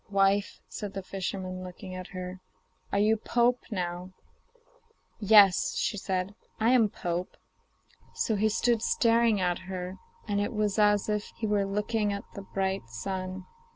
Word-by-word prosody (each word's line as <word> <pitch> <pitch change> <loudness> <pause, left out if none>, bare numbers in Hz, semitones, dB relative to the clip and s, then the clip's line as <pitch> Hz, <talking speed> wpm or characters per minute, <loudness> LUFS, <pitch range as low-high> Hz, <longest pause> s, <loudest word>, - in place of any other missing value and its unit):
'Wife,' 195 0 +2
said 205 -1 -6
the 195 - -4
fisherman 185 -1 -4
looking 185 +1 -8
at 185 0 -6
her, 185 0 -7 0.5
'are - - +1
you 215 +2 +4
pope 240 +3 +2
now?' 180 -3 -3 1.1
'Yes,' 205 -3 +6 0.2
said 185 0 -1
she; - - -36 0.2
'I 220 +1 +3
am 235 -5 +5
pope.' 175 -1 -4 0.8
So 220 - 0
he 215 +2 +2
stood 230 +1 +2
staring 230 -2 +3
at 180 -1 0
her, 185 0 -5 0.3
and 205 -1 0
it 205 - -2
was 210 -1 0
as 210 -1 +4
if 210 -1 -1
he 225 - -2
were 205 -2 +2
looking 210 +1 0
at 200 0 -4
the 200 - -7
bright 190 -7 -2
sun. 185 +10 -5
200 Hz, 155 wpm, -29 LUFS, 185-210 Hz, 1.1 s, Yes